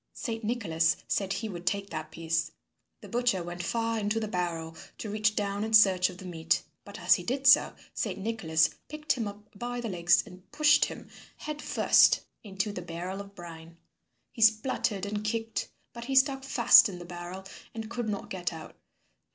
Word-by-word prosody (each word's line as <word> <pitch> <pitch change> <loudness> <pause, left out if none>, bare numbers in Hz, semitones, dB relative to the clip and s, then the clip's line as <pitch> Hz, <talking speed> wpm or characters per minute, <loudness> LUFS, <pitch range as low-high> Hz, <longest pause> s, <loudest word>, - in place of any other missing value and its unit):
Saint 225 -1 -4
Nicholas 195 -8 +1
said 195 -2 -1
he 210 +4 -2
would 175 -4 -8
take 200 0 -1
that 155 -1 -5
piece. 165 0 -2 0.5
The - - -11
butcher 240 -6 0
bent 175 +1 -6
far 230 +4 -1
into 210 +2 0
the 220 - -3
barrel 170 -4 -3 0.2
to 215 - -6
reach 215 0 +1
down 200 0 -1
in 220 0 -4
search 190 -4 +6
of 180 - -10
the 185 - -11
meat. 165 -2 0 0.2
But 205 +2 -10
as - - +5
he 180 - 0
did 265 +8 -3
so, 275 +2 +6 0.2
Saint - - -3
Nicholas 185 -7 +1 0.2
picked 305 0 -3
him 230 -4 -3
up 205 +1 -9
by 245 +3 -4
the 235 -2 -4
legs 175 0 +3
and 180 0 -15
pushed 300 0 +4
him - - -9 0.3
head 300 -1 -6
first - - +4 0.2
into 200 0 -3
the 185 - -6
barrel 175 +3 -5
of 200 0 -13
brine. 165 -1 -11 0.5
He 225 - -9
spluttered 220 -2 +2
and 205 +1 -4
kicked, 225 +1 -3 0.2
but 235 0 -8
he 270 - -2
stuck 270 0 +3
fast 245 -5 +6
in 185 - -7
the 175 - -9
barrel, 175 +2 -8 0.3
and 220 -1 -5
could 235 0 -4
not 200 -1 -5
get 180 -2 -3
out. 160 -1 -10
200 Hz, 190 wpm, -29 LUFS, 175-225 Hz, 0.5 s, search